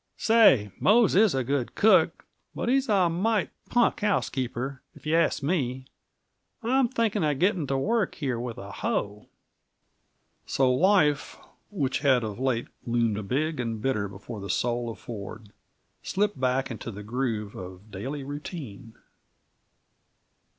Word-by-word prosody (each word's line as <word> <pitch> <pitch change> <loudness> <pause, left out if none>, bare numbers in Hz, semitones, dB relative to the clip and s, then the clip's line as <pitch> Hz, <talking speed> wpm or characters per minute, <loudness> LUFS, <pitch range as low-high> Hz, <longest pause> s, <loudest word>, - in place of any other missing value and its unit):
Say, 210 - +5
Mose 220 +1 +4
is 205 -4 +4
a 130 - +1
good 130 -1 -2
cook, 220 - +4 0.3
but - - -2
he's 270 0 +2
a 195 -4 +4
mighty 195 +5 0 0.2
punk 240 -1 +2
housekeeper, 135 - -1
if - - -16
you 155 +1 +1
ask 165 -3 +2
me. 130 -5 -1 0.8
I'm 255 +2 +3
thinking 220 -5 0
of 150 -2 +1
getting 180 -2 +1
to 135 - 0
work 220 - 0
here 130 -6 -2
with 120 -1 -5
a 100 +1 -8
hoe!" 105 +1 -3 1.2
So 130 -2 +2
life, 150 -2 +2 0.3
which 140 -10 -1
had 130 -5 +3
of 105 0 -5
late 130 -3 0 0.2
loomed 115 -4 0
big 155 +5 -1
and 115 -2 -2
bitter 105 -4 0
before 100 +3 -9
the 100 - -7
soul 120 +4 0
of 115 - -7
Ford, 105 -1 -8 0.5
slipped 205 -6 -1
back 130 +1 0
into 115 0 -6
the 105 -1 -8
groove 110 -2 -2
of 95 +3 -10
daily 135 +9 -5
routine. 140 - -8
135 Hz, 145 wpm, -27 LUFS, 115-180 Hz, 1.2 s, Say